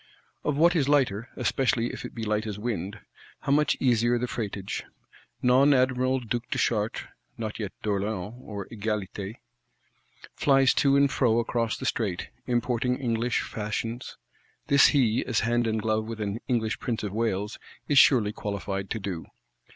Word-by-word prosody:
Of 145 -2 0
what 170 +3 +5
is 145 -4 +2
lighter, 125 -6 +2
especially 120 -3 0
if - - -7
it - - -9
be 115 - -4
light 105 0 0
as 105 -2 -4
wind, 105 -2 -4 0.4
how - - -1
much 150 +1 +3
easier 120 -1 +3
the 120 - -1
freightage! 100 -5 -4 0.6
Non 135 +3 +5
Admiral 130 0 +2
Duke 120 0 -3
de - - -1
Chartres 110 -1 0 0.3
(not 110 -2 -4
yet 105 -4 -3
d'Orléans 100 0 -2
or 100 -4 -6
Egalité) 105 -2 -4 1.0
flies 135 -2 +4
to 140 -1 +3
and 140 0 +4
fro 115 -4 +2
across 115 -1 0
the - - -6
Strait; 100 -7 -1 0.2
importing 125 0 0
English 120 -2 0
Fashions; 115 +3 -4 0.5
this 140 0 +6
he, 125 -6 +2
as 120 -4 +1
hand 120 +1 +1
and 110 -1 -1
glove 110 0 0
with 115 -1 -6
an 105 +1 -2
English 115 -3 0
Prince 115 -4 -3
of 100 -2 -3
Wales, 105 -1 -1 0.3
is 145 -2 +6
surely 110 -7 +5
qualified 100 -2 -4
to - - -2
do. 95 -5 -5
115 Hz, 160 wpm, -27 LUFS, 105-125 Hz, 1.0 s, this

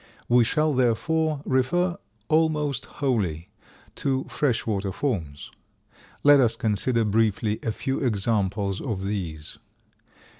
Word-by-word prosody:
We 120 0 +5
shall, 155 +5 +1
therefore, 145 +5 +1
refer 170 +8 +1 0.3
almost 150 -4 +1
wholly 100 - -2 0.5
to 135 -3 0
fresh 125 -6 -1
water 100 -3 -1
forms. 90 - -3 0.7
Let 145 0 +7
us 120 -4 +3
consider 115 +2 0
briefly 110 0 +1
a 115 - -1
few 135 +5 -3
examples 100 -4 0
of 105 -8 -3
these. 85 -7 -5
115 Hz, 110 wpm, -25 LUFS, 100-140 Hz, 0.7 s, Let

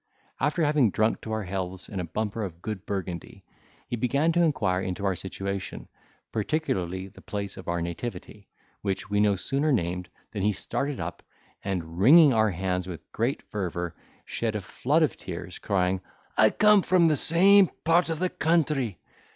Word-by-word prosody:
After 150 +4 +1
having 145 -6 +4
drunk 110 +3 +1
to 110 - -6
our 110 -1 -1
healths 95 -1 -4
in 100 - -5
a - - -2
bumper 105 +6 -3
of 85 -4 -6
good 105 -3 -5
Burgundy, 90 -4 -5 0.4
he - - -2
began 140 +7 +1
to 175 +1 +2
inquire 110 - +1
into 95 +1 -3
our 95 -1 +1
situation, 95 +2 -5 0.4
particularly 95 - -2
the 95 - -16
place 100 -1 -5
of 95 - -11
our 85 -1 -1
nativity, 100 +3 -6 0.3
which 100 0 -3
we 105 - +2
no 105 -1 +4
sooner 140 +10 0
named 90 -6 -1 0.2
than 105 - -4
he 105 +2 +2
started 140 +7 -3
up, 85 0 -5 0.4
and, 85 -3 -4
wringing 145 - +8
our 110 -1 +3
hands 90 0 -2
with 90 -3 -9
great 120 +5 -1
fervour, 90 -4 -4 0.3
shed 115 -2 -2
a 105 - -2
flood 145 - +1
of 155 - 0
tears, 90 0 -7
crying, 95 -2 0 0.3
"I 110 0 +6
come 210 - +5
from 180 -2 +4
the 155 - +3
same 190 +6 +6 0.2
part 170 +2 +4
of 165 - -1
the 185 +3 0
country! 150 - +1
105 Hz, 175 wpm, -27 LUFS, 95-145 Hz, 0.4 s, wringing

